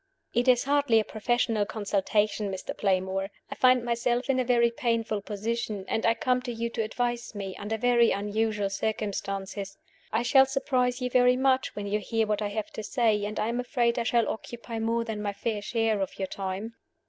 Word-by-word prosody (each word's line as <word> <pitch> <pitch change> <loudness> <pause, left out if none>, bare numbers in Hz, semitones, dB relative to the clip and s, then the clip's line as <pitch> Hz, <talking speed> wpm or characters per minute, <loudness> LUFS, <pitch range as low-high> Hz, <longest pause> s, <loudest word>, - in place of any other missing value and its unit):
"It 240 +2 +1
is 250 -1 +5
hardly 280 -5 +3
a - - +1
professional 225 0 0
consultation, 205 0 0
Mr. 190 -1 -5
Playmore. 190 0 0 0.2
I - - -1
find 255 -1 +4
myself 240 +2 0
in 260 - +1
a - - +2
very 235 -1 +3
painful 230 -3 -1
position; 215 -1 -3
and 225 - 0
I 230 - +4
come 250 +2 +1
to 250 -1 -4
you 235 0 -3
to 230 - -2
advise 240 +1 -2
me, 195 -2 -5
under 210 +2 -3
very 235 0 +4
unusual 210 0 0
circumstances. 195 -1 -3 0.3
I 235 - +1
shall 270 +2 +6
surprise 260 -2 0
you 250 0 -2
very 250 0 +5
much 260 0 +2
when 205 - -4
you 205 +1 0
hear 225 +2 0
what 210 0 -1
I 210 - 0
have 210 +1 -4
to - - -6
say; 215 -2 +1
and 210 0 -4
I 215 - 0
am 240 +1 -1
afraid 240 -1 +1
I - - 0
shall 235 -1 +2
occupy 230 0 -5
more 230 +1 0
than 220 -2 -4
my 205 -1 -2
fair 210 +1 -2
share 220 -1 0
of 190 - -3
your 190 - -2
time." 195 +3 -4
225 Hz, 200 wpm, -28 LUFS, 205-240 Hz, 0.3 s, shall